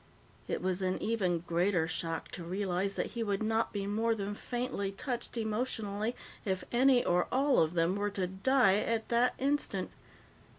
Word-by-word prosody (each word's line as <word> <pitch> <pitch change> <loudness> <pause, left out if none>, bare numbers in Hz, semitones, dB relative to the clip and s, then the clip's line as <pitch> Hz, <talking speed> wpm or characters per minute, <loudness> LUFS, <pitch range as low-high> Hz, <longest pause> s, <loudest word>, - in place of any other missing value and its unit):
It - - -2
was 185 0 0
an 185 0 0
even 185 -7 0
greater 175 0 +1
shock 165 0 -3
to 175 - -7
realize 190 +2 -1
that - - -2
he 235 - -3
would 205 -1 0
not 225 +1 +1
be 200 -1 -3
more 225 +3 +1
than 205 -1 -3
faintly 240 -3 -3
touched 240 +4 -4
emotionally 220 -1 -2 0.3
if 190 -3 -1
any 250 0 +4
or 175 0 +2
all 275 +1 +3
of 160 +2 +2
them 170 +2 +2
were 205 0 0
to 195 -2 -1
die 195 +3 +3
at 225 +1 -1
that 240 +1 +3
instant. 285 +2 -1
205 Hz, 170 wpm, -32 LUFS, 185-235 Hz, 0.3 s, any